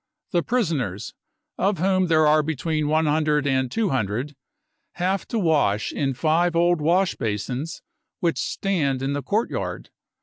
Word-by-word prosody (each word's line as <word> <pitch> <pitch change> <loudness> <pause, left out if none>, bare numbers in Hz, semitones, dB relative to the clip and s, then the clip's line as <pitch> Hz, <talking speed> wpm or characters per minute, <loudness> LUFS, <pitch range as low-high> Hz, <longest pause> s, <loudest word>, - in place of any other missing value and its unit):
The 175 - +2
prisoners, 155 - -2 0.5
of 195 0 +1
whom 185 +1 +2
there 155 -2 +4
are 155 +1 +5
between 155 0 -2
100 150 -1 +2
and 130 -2 +1
200, 135 - -1 0.6
have 185 +2 -1
to 235 - -2
wash 150 - +1
in 135 -2 -1
five 165 +4 +1
old 175 -1 +3
wash 180 +5 +2
basins 125 +8 -4 0.4
which 170 -2 0
stand 145 -10 -1
in 135 +1 -1
the 145 - -2
courtyard. 210 - -2
155 Hz, 135 wpm, -23 LUFS, 135-175 Hz, 0.6 s, are